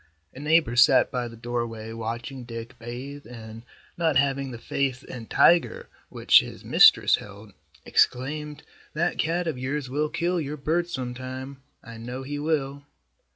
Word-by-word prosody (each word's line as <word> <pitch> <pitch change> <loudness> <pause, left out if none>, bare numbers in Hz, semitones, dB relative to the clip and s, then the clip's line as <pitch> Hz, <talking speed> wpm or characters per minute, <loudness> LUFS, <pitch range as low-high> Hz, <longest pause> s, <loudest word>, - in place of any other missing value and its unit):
A - - -11
neighbor 150 -4 +2
sat 125 +1 +5
by 125 -1 -2
the 115 - -11
doorway 115 -1 -4
watching 115 +3 -5
Dick 115 0 -8
bathe 130 +5 -8
and, 115 -2 -10 0.4
not 165 -3 +1
having 135 -1 +1
the 120 - -7
faith 130 +2 -2
in 115 -3 -9
Tiger 170 -1 +3 0.2
which - - +5
his - - -8
mistress - - +6
held, 100 0 -12 0.3
exclaimed, 150 +3 0 0.3
"That 170 +3 0
cat 170 +3 0
of 155 -6 -3
yours 135 0 -3
will 150 +2 0
kill 175 +2 -1
your 150 +1 -5
bird 165 +5 -1
sometime. 130 0 -6 0.2
I 115 -1 -10
know 125 +3 -6
he 145 +2 -5
will." 140 -2 -1
130 Hz, 155 wpm, -25 LUFS, 120-150 Hz, 0.4 s, mistress